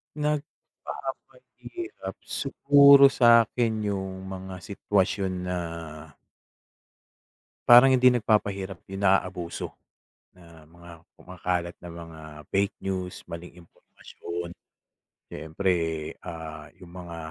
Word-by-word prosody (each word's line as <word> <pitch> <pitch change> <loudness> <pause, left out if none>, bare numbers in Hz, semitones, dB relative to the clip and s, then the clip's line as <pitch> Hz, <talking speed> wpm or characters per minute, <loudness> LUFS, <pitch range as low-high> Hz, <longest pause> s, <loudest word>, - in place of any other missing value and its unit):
Nagpapahirap? 155 - -6
Siguro 140 -1 +6
sa'kin 115 -2 +3
'yong 95 -2 -4
mga 95 0 -7
sitwasyon 100 -1 0
na 90 0 -2 2.1
parang 120 +3 +9
hindi 130 -1 +5
nagpapahirap, 100 -6 +1
'yong 95 +1 -6
naaabuso 90 -3 0 0.6
na 85 -3 -17
mga 85 +2 -15 0.2
kumakalat 90 -1 -4
na 85 - -10
mga 85 -1 -10 0.3
fake 100 +2 0
news, 95 -2 -4
maling 85 +1 -8
impormasyon. 85 +1 -9 0.8
Siyempre, 80 +5 -2 0.5
ah, 80 -2 -8
'yong 90 -1 -14
mga 85 -2 -9
95 Hz, 85 wpm, -26 LUFS, 85-115 Hz, 2.1 s, parang